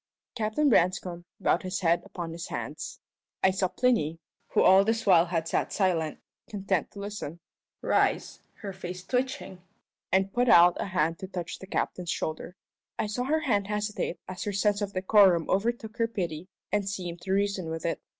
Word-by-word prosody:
Captain 225 +6 +1
Branscome 180 -5 +2
bowed - - +2
his 185 +2 -3
head 170 -1 +3
upon 170 -2 -6
his 165 +1 -6
hands. - - -6 0.4
I 190 - +6
saw 185 0 0
Plinny 180 -9 +1 0.3
who - - +2
all 190 +1 +7
this 225 +2 0
while 175 -3 +6
had 165 -2 -1
sat - - 0
silent, 170 -6 0 0.3
content 195 -5 -1
to 200 - -9
listen 200 -6 -6 0.4
rise, - - +1 0.2
her 200 -2 -5
face 180 -1 -7
twitching, 250 -6 -2 0.5
and 190 +1 +2
put 245 0 +2
out 175 -2 +7
a - - -1
hand 165 -3 0
to 190 - -6
touch 175 -3 -5
the 190 - -10
captain's 180 -2 -2
shoulder. 160 +2 -3 0.4
I - - 0
saw 215 +4 -2
her 310 +3 +1
hand 205 -9 +1
hesitate 210 -3 -2
as 185 0 -5
her 205 - -2
sense 205 +1 +1
of 200 -1 -3
decorum 185 -3 +4
overtook 225 +2 -1
her 230 -2 +2
pity 175 -6 -4 0.2
and 205 -1 0
seemed 175 -3 -5
to 190 - -4
reason 200 -3 0
with 160 0 -4
it. 165 - -1
190 Hz, 180 wpm, -28 LUFS, 175-210 Hz, 0.5 s, all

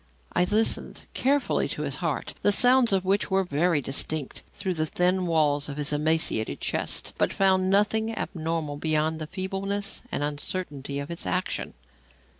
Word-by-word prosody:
I 180 - +3
listened 215 +4 0
carefully 280 +2 +1
to - - -4
his - - -2
heart, - - -2
the 205 - +4
sounds 245 +2 +5
of 190 -1 +1
which 200 +2 +1
were 190 0 +2
very 165 -1 +1
distinct 140 +2 -1
through 190 -2 -3
the 155 -2 -1
thin 180 +2 +1
walls 150 -3 +2
of 140 - -6
his 150 0 -1
emaciated 150 -7 +1
chest, - - -2
but - - +2
found 190 -1 +3
nothing 210 +3 +2
abnormal 160 -3 -3
beyond 155 +1 0
the 155 - -5
feebleness 195 +3 -3
and - - -1
uncertainty 145 -1 -3
of 140 +3 -5
its 170 - -4
action. 90 - -2
170 Hz, 160 wpm, -26 LUFS, 150-195 Hz, -, sounds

